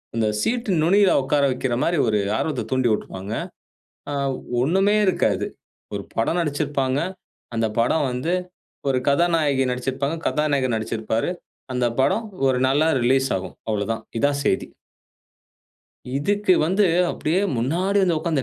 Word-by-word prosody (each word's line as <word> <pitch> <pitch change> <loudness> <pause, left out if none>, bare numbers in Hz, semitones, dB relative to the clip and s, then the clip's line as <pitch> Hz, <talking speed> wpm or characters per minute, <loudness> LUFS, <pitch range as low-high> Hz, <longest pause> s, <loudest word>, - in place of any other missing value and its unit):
அந்த 110 -1 +1
சீட் 235 -2 -1
நுனியில 195 +4 +4
உட்கார 140 +2 +1
வைக்கிற 125 -1 -2
மாதிரி 170 -1 +1
ஒரு 105 -1 +2 0.2
ஆர்வத்த 145 -6 -2
தூண்டி 130 -2 +2
விட்ருவாங்க. 100 0 -3 0.8
அ - - -2 0.5
ஒண்ணுமே 195 +8 +3
இருக்காது. 185 - +1 0.5
ஒரு 100 - -3
படம் 140 +10 0
நடிச்சுருப்பாங்க. 145 -3 0 0.6
அந்த 115 0 +2
படம் 140 +5 +2
வந்து 130 +8 -2 0.6
ஒரு 130 -1 +2
கதாநாயகி 145 -3 +2
நடிச்சுருப்பாங்க, 135 +5 -2
கதாநாயகர் 140 -5 +1
நடிச்சிருப்பாரு. 110 +4 -2 0.4
அந்த 125 -1 +1
படம் 220 +11 +2 0.2
ஒரு 125 -1 +2
நாள்ல 150 +4 +3
ரிலீஸ் 135 +2 +3
ஆகும் 95 - -6
அவ்வளவுதான். 110 +2 -2 0.2
இதான் 140 +1 +1
செய்தி. 95 - +1 1.5
இதுக்கு 200 +4 +2
வந்து 190 +3 +3 0.2
அப்படியே 165 +5 0 0.2
முன்னாடி 180 - +1
வந்து 175 -4 +2
உட்கார்ந்து, 155 -4 -1
140 Hz, 125 wpm, -23 LUFS, 125-170 Hz, 1.5 s, நுனியில